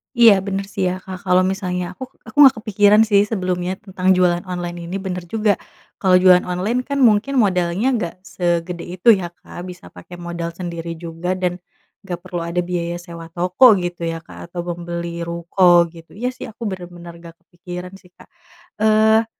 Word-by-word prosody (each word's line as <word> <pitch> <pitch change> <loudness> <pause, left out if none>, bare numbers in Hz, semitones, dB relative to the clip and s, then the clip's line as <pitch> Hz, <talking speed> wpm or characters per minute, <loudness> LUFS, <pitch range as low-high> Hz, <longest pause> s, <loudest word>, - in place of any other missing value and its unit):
Iya 235 -3 +8
bener 195 0 -2
sih 195 - -2
ya 180 - 0
Kak 185 -1 -7
kalau 180 0 +4
misalnya 185 -1 -2
aku 185 - -9 0.2
aku 220 - -13
gak 265 - +2
kepikiran 210 -1 +4
sih 200 -2 +5
sebelumnya 185 -3 -2
tentang 190 -2 -4
jualan 175 -1 +2
online 175 -1 -5
ini 180 - -5
bener 180 -1 -3
juga 210 0 +1 0.4
kalau 185 -2 +4
jualan 180 -1 +6
online 185 +7 -1
kan 280 0 -2
mungkin 230 +3 +3
modalnya 180 +3 0
gak 175 -5 -4
segede 175 -1 -2
itu 185 - -7
ya 175 - -4
Kak - - -12
bisa 180 0 -11
pakai 175 - -12
modal 170 -1 -5
sendiri 170 -2 -5
juga 170 +2 -4
dan 180 -1 -2 0.5
gak 175 -2 -5
perlu 175 - -5
ada 170 +1 -1
biaya 175 -1 -3
sewa 170 -2 -10
toko 185 +7 +5
gitu 175 -2 -3
ya 165 0 -4
Kak, 170 - -12
atau 175 - -3
membeli 170 -1 -5
ruko 170 +1 +4
gitu 165 -1 -15
iya 245 +5 -2
sih 255 - -9
aku 225 +2 -10
bener-bener 175 -2 -8
gak 170 -1 -13
kepikiran 180 +1 -9
sih 180 -2 -23
Kak, - - -18 0.5
eee, 220 +1 +4
180 Hz, 180 wpm, -20 LUFS, 175-195 Hz, 0.5 s, Iya